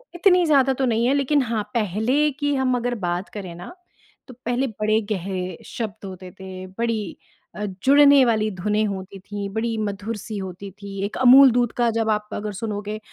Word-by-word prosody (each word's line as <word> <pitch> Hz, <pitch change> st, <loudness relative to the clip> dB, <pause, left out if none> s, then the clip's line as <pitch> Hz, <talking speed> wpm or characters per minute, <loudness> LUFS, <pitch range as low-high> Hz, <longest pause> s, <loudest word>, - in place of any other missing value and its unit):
इतनी 360 Hz, -1 st, +4 dB
ज़्यादा 270 Hz, -3 st, +4 dB
तो -, -, +3 dB
नहीं 230 Hz, 0 st, +1 dB
है 270 Hz, -, +3 dB
लेकिन 280 Hz, +1 st, +2 dB
हाँ, 225 Hz, -4 st, -1 dB
पहले 235 Hz, +8 st, +1 dB
की 290 Hz, 0 st, 0 dB
हम 260 Hz, -1 st, +1 dB
अगर 245 Hz, 0 st, -2 dB
बात 175 Hz, +3 st, -2 dB
करें 185 Hz, -4 st, -6 dB
ना, 180 Hz, -, -9 dB, 0.5 s
तो 255 Hz, -, -11 dB
पहले 245 Hz, +3 st, 0 dB
बड़े 215 Hz, +1 st, +2 dB
गहरे 185 Hz, -1 st, -3 dB
शब्द 220 Hz, -3 st, -6 dB
होते 185 Hz, -1 st, -9 dB
थे 185 Hz, -1 st, -8 dB
बड़ी 230 Hz, -4 st, -2 dB, 0.4 s
अ, 210 Hz, -, -3 dB, 0.2 s
जुड़ने 280 Hz, 0 st, +7 dB
वाली 215 Hz, -2 st, +1 dB
धुनें 210 Hz, +3 st, 0 dB
होती 195 Hz, 0 st, -6 dB
थीं 200 Hz, +1 st, -6 dB
बड़ी 225 Hz, 0 st, -1 dB
मधुर 210 Hz, +1 st, -3 dB
सी 210 Hz, +1 st, -7 dB
होती 190 Hz, +1 st, -7 dB
थी। 200 Hz, -1 st, -7 dB
एक 205 Hz, -, -5 dB
अमूल 260 Hz, +1 st, +8 dB
दूध 240 Hz, -1 st, +1 dB
का 240 Hz, -1 st, +3 dB
जब 220 Hz, -1 st, 0 dB
आप 210 Hz, 0 st, -1 dB
अगर 210 Hz, 0 st, -4 dB
सुनोगे 210 Hz, -1 st, -4 dB
215 Hz, 185 wpm, -23 LUFS, 200-250 Hz, 0.5 s, अमूल